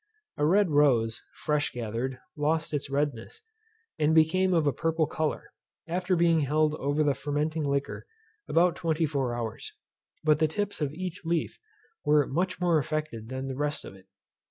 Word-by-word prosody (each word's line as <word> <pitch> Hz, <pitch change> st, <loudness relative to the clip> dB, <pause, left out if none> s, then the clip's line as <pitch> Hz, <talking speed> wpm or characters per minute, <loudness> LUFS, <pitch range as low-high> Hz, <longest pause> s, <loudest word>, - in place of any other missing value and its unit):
A 145 Hz, -, +2 dB
red 195 Hz, 0 st, +3 dB
rose, 120 Hz, -6 st, +3 dB
fresh 150 Hz, -1 st, 0 dB
gathered, 120 Hz, +2 st, -4 dB, 0.2 s
lost 155 Hz, +2 st, 0 dB
its 145 Hz, -1 st, -2 dB
redness, 140 Hz, -, -2 dB, 0.6 s
and 155 Hz, +1 st, +3 dB
became 185 Hz, +4 st, +4 dB
of 165 Hz, -4 st, +3 dB
a 145 Hz, -, +2 dB
purple 165 Hz, +3 st, +1 dB
colour, 155 Hz, 0 st, -3 dB, 0.4 s
after 180 Hz, +2 st, 0 dB
being 170 Hz, -1 st, +4 dB
held 150 Hz, +1 st, +2 dB
over 145 Hz, 0 st, 0 dB
the 145 Hz, -2 st, +3 dB
fermenting 150 Hz, +3 st, -2 dB
liquor 140 Hz, 0 st, -2 dB, 0.4 s
about 175 Hz, +1 st, +3 dB
twenty 165 Hz, -1 st, 0 dB
four 135 Hz, -5 st, -1 dB
hours; 115 Hz, -2 st, -5 dB, 0.5 s
but 155 Hz, -1 st, +4 dB
the 160 Hz, -, +4 dB
tips 205 Hz, +3 st, -3 dB
of 145 Hz, -2 st, 0 dB
each 180 Hz, +2 st, -6 dB
leaf 165 Hz, -1 st, -1 dB, 0.4 s
were 150 Hz, -1 st, +4 dB
much 180 Hz, +6 st, -1 dB
more 175 Hz, -3 st, +3 dB
affected 150 Hz, -7 st, -4 dB
than 130 Hz, +1 st, -4 dB
the 135 Hz, -, -4 dB
rest 145 Hz, +1 st, -2 dB
of -, -, -9 dB
it. 95 Hz, -1 st, -17 dB
150 Hz, 165 wpm, -28 LUFS, 140-165 Hz, 0.6 s, became